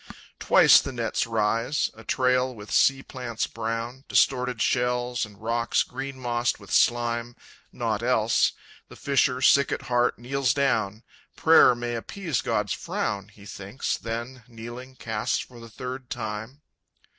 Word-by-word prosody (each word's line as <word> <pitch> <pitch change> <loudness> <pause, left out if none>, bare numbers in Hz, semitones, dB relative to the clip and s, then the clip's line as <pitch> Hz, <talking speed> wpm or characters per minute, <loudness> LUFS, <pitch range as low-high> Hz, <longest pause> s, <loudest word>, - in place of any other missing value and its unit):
Twice - - +6
the 140 - -5
nets 115 -3 -1
rise, 115 +5 0
a 110 - -14
trail 125 +1 +1
with 105 -1 -11
sea 135 -1 +3
plants 120 -3 -4
brown, 115 +3 -4
Distorted 125 -3 +2
shells, 125 0 0
and 105 -1 -18
rocks 115 +1 0
green 135 +1 -7
mossed 120 -1 -1
with - - -13
slime, 120 0 +1 0.4
Nought - - -2
else. - - +2 0.4
The - - -12
fisher, 135 -2 +1
sick 140 0 +5
at - - -3
heart, 120 0 +1
kneels 130 +2 0
down; 110 -6 0 0.3
"Prayer 160 -6 +6
may 120 0 -4
appease 155 - -3
God's - - -1
frown," 100 -1 -3
He 100 -1 -17
thinks, 100 +4 -4
then, 120 +3 -6
kneeling, 120 +2 -9
casts 110 -4 -2
for 120 -2 -8
the 115 0 -11
third 125 +2 -7
time. 110 +4 -5
120 Hz, 145 wpm, -26 LUFS, 115-130 Hz, 0.4 s, Twice